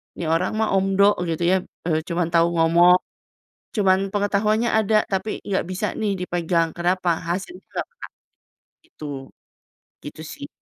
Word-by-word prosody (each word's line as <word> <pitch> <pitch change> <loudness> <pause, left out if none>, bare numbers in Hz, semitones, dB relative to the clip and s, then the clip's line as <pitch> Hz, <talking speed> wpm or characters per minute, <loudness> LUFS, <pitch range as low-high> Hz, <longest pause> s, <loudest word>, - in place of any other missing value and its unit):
ini 170 - -5
orang 180 +6 0
mah 220 - +1
omdo," 195 +1 +3
gitu 165 0 -3
ya, 180 +2 +4 0.3
eee, 155 -1 +2
"cuma 175 0 0
tau 170 0 +5
ngomong." 170 +2 +5 0.8
Cuma 195 -3 +4 0.2
pengetahuannya 210 +3 +1
ada, 215 0 +3
tapi 195 +2 -2
nggak 195 -1 0
bisa 190 +3 -2
nih 205 -3 -2
dipegang, 170 -2 0
kenapa? 180 +1 0 0.2
Hasilnya 190 - -4
nggak - - -3
ada, 485 +1 -18 0.8
gitu. 245 - -10 1.0
Gitu 150 +2 -8
sih. 140 -2 -8
185 Hz, 140 wpm, -22 LUFS, 170-205 Hz, 1.0 s, tau